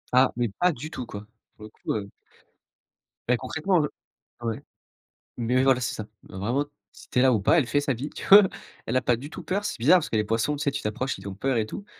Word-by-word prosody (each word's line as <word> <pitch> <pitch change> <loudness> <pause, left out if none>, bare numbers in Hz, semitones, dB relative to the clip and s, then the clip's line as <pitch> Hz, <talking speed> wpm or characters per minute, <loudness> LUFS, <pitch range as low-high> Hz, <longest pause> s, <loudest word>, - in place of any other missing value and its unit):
Ah, 130 +1 +6
mais 120 - +1
pas 180 0 +4
du 155 +2 -7
tout 125 -6 -6
quoi, 100 -1 -8 0.3
pour 110 - -14
le 110 - -9
coup, - - -4
heu 105 -2 -3 1.2
Bah, 125 0 +3
concrètement 160 +8 0
le 150 -2 0 0.5
ouais, 115 -2 -3 0.8
mais, 125 +2 +2
voilà 135 -2 +4
c'est 120 - -2
ça. 110 - -4 0.3
Heu, 95 - -9
vraiment 120 +9 0 0.3
si - - -16
tu 125 - +1
es - - +5
là 130 0 +5
ou 110 - +2
pas 100 - +4
elle 150 - +3
fait 145 - +2
sa 145 -2 0
vie, 135 +6 -5
tu - - -8
vois? 205 +1 +10 0.4
Elle 120 - 0
a - - +2
pas 120 - +2
du 135 +6 -8
tout - - -8
peur 200 +2 -1
c'est 210 0 -3
bizarre, 185 - +6
parce - - -5
que 110 - 0
les 105 - +1
poissons 115 +7 0
tu 145 - -3
sais 140 - +1
tu 145 - -4
t'approches 120 +5 -2
ils - - -9
ont 95 - -7
peur 130 +6 0
et 110 - +1
tout. 200 - -8
130 Hz, 265 wpm, -26 LUFS, 115-145 Hz, 1.2 s, vois